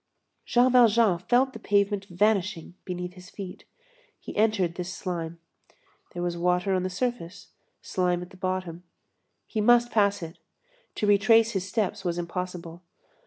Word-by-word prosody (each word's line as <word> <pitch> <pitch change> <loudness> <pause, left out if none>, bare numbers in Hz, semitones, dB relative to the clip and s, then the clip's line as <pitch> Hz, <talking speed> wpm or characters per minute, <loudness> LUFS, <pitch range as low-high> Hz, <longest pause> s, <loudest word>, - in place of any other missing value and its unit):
Jean 250 +1 +3
Valjean 230 -6 +5
felt 250 +7 +2
the 225 - -8
pavement 200 -1 +1
vanishing 190 -3 0
beneath 180 -1 -5
his 180 0 -13
feet. 190 -3 -9 0.5
He - - -9
entered 210 -5 +2
this 180 +1 -5
slime. 170 -2 -5 0.8
There 175 - -3
was 175 -1 -1
water 180 +2 +1
on 185 - +1
the 185 - -2
surface, 200 -3 -4 0.3
slime 180 -1 0
at 180 - -13
the - - -14
bottom. 185 -2 -3 0.6
He 215 - -2
must 240 +2 +4
pass 200 -4 +2
it. 165 0 -9 0.6
To - - -1
retrace 225 +3 +5
his 195 -2 -3
steps 200 -1 -1
was 175 -2 -2
impossible. 175 -1 -5
185 Hz, 150 wpm, -26 LUFS, 175-215 Hz, 0.8 s, Valjean